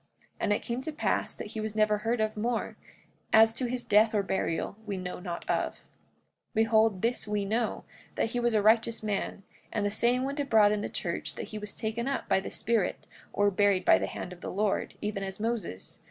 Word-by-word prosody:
And - - 0
it 205 - +1
came 240 +2 -3
to 315 - -4
pass 300 - -1
that - - -7
he 220 - -5
was 215 0 -3
never 215 -1 +3
heard 230 +2 0
of 215 0 0
more; 230 +2 -1 0.6
as 220 0 +7
to 245 +2 -2
his 250 0 -3
death 215 +1 +4
or 205 - +2
burial 190 -2 -1
we 200 -2 -2
know 180 -1 -5
not 175 -2 -6
of. - - 0
45:19 - - -24 0.7
Behold, 220 -3 +3
this 235 -1 0
we 210 -1 -1
know, 225 +2 -1 0.3
that 225 - 0
he 245 - -1
was 240 -1 +1
a 210 - +3
righteous 225 +1 +3
man; 205 -1 -2 0.3
and 210 -2 -1
the 205 - +1
saying 240 +4 +2
went 280 +2 -3
abroad 220 -7 +5
in 210 -1 0
the - - -3
church - - -3
that - - -6
he 215 - -5
was 210 -1 -7
taken 225 +3 -3
up 275 - -2
by 195 -1 +3
the 190 - -6
Spirit, 225 -3 0 0.3
or 205 0 +2
buried 200 -1 +2
by - - +6
the - - -1
hand 180 - -6
of 175 - -14
the - - -5
Lord, 205 +1 0
even 210 -1 -2
as 190 0 -5
Moses. 220 - -3
215 Hz, 225 wpm, -29 LUFS, 205-230 Hz, 0.7 s, as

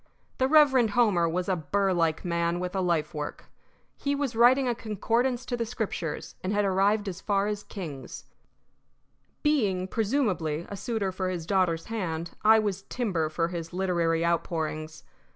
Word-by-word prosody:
The 260 - +3
Reverend 265 -6 +5
Homer 190 -8 +4
was 180 +2 -2
a 190 - +2
burr 190 +5 0
like 165 -1 0
man 170 0 0
with 180 +1 -4
a 190 - +1
life 170 -4 0
work. 150 -1 -5 0.5
He 280 0 -1
was 280 -4 -2
writing 250 +3 +5
a 240 - +2
concordance 235 +3 -1
to 245 - -2
the 235 - -1
Scriptures, 215 -8 -4
and 185 - -1
had 205 0 +2
arrived 200 +2 +2
as 190 -1 -5
far 200 -1 +1
as 210 -1 -2
Kings. 160 -11 -8 1.2
Being, 205 -12 +1
presumably, 195 - 0
a 200 - -6
suitor 205 -2 -2
for 185 0 -2
his 175 -3 -4
daughter's 180 -3 +1
hand, 170 -7 -3
I 220 +1 +7
was 205 -3 -1
timber 185 -11 -1
for 165 +2 -1
his 170 -2 -6
literary 170 -3 +1
outpourings. 160 -2 -2
190 Hz, 165 wpm, -27 LUFS, 170-225 Hz, 1.2 s, I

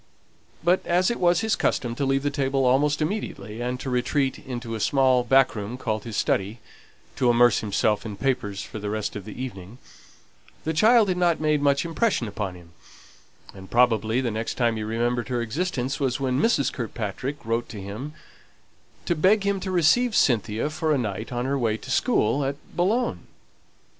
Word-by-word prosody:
But 175 +2 +3
as 180 +4 +2
it 235 - -3
was 175 +1 +3
his 220 -1 +1
custom 120 -2 0
to 140 +3 -2
leave 135 0 +1
the 145 - 0
table 135 -2 0
almost 145 +4 +2
immediately 150 - -4
and 125 +1 -2
to 130 - -5
retreat 130 +2 0
into 120 -3 -6
a 110 - -3
small 130 +1 +3
back 135 +1 +4
room 105 +4 -5
called 110 -4 -3
his 110 -3 -5
study, 100 +4 0 0.6
to 125 - +3
immerse 120 -1 +5
himself 105 0 0
in 105 -3 -7
papers 105 -6 -1
for 110 - -8
the 105 0 -4
rest 110 0 -3
of 100 -2 -6
the 110 - -9
evening, 110 -4 -7 0.9
the 160 - -1
child 220 +5 +5
had 180 - 0
not 175 -2 +2
made 155 -1 +1
much 140 +2 +2
impression 170 - 0
upon 100 -2 -4
him; 85 -1 -15 0.8
and 95 -1 -12
probably 115 -1 +2
the 120 -3 -1
next 110 +1 -3
time 120 -2 +1
he 110 - -4
remembered 120 +2 -1
her 125 -1 -1
existence 135 +1 -2
was 135 -2 0
when 130 0 0
Mrs. 225 - +2
Kirkpatrick 120 +3 -4
wrote 115 +1 -1
to 110 - -7
him 105 +10 -7 0.9
to - - +1
beg 190 +6 +3
him 200 -1 +1
to 190 - -5
receive 210 +7 +3
Cynthia 115 +2 +1
for 160 0 -1
a 150 - +3
night 110 -2 -4
on 120 0 -2
her 140 +1 0
way 110 -3 0
to 130 - -9
school 140 - +2
at 135 +1 -1 0.2
Boulogne. 220 +8 0
125 Hz, 190 wpm, -25 LUFS, 110-150 Hz, 0.9 s, immerse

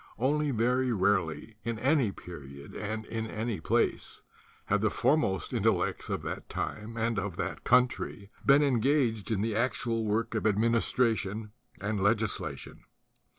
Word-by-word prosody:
Only 145 +5 +1
very 125 +1 +1
rarely 100 0 0
in 115 +1 -2
any 130 -2 +2
period 70 -6 -10
and 110 +1 -4
in 110 0 -3
any 110 -4 -3 1.0
have - - +1
the - - +3
foremost 140 -11 +1
intellects - - +1
of - - -2
that - - -5
time 110 +2 -4
and 115 -1 0
of 95 -3 -4
that - - -3
country 120 -4 +1
been 140 +2 +6
engaged 125 -4 +2
in 105 -3 0
the 110 0 -1
actual 115 -1 0
work 110 +2 0
of 110 -1 +1
administration 110 -1 +1 0.3
and 100 0 -2
legislation. 105 +1 -1
110 Hz, 135 wpm, -30 LUFS, 105-120 Hz, 1.0 s, been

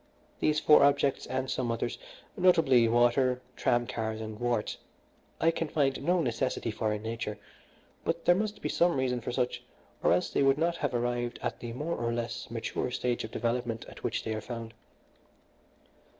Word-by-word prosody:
These 155 0 +2
four 150 - +6
objects, 140 -1 +2
and 130 0 -2
some 125 -2 -1
others 115 - -2 0.4
notably 160 - +5
water, 120 +2 +3 0.2
tram 120 0 +2
cars, 110 -2 -3
and 110 -1 -6
warts 120 -3 -1 0.6
I 165 - +4
can 165 0 -2
find 140 -3 +1
no 175 +4 +2
necessity 115 -1 -1
for 110 0 -1
in 105 0 -3
nature; 110 -2 -4 0.7
but 165 0 -2
there 175 - +7
must 205 +2 -2
be - - 0
some 170 -4 +2
reason 125 -2 0
for 120 - -4
such, 125 0 -1 0.4
or - - +3
else 90 +1 +2
they - - +1
could 135 0 +4
not 170 +2 +1
have 145 -5 -1
arrived 120 0 -1
at 120 -2 -2
the 120 - -6
more 150 +7 -2
or 120 0 -1
less 120 0 -4
mature 115 +1 -3
stage 125 -1 -1
of 110 - -5
development 115 0 -2
at - - -12
which - - -1
they 110 - -2
are 110 - -3
found. 115 0 -7
120 Hz, 180 wpm, -30 LUFS, 115-140 Hz, 0.7 s, there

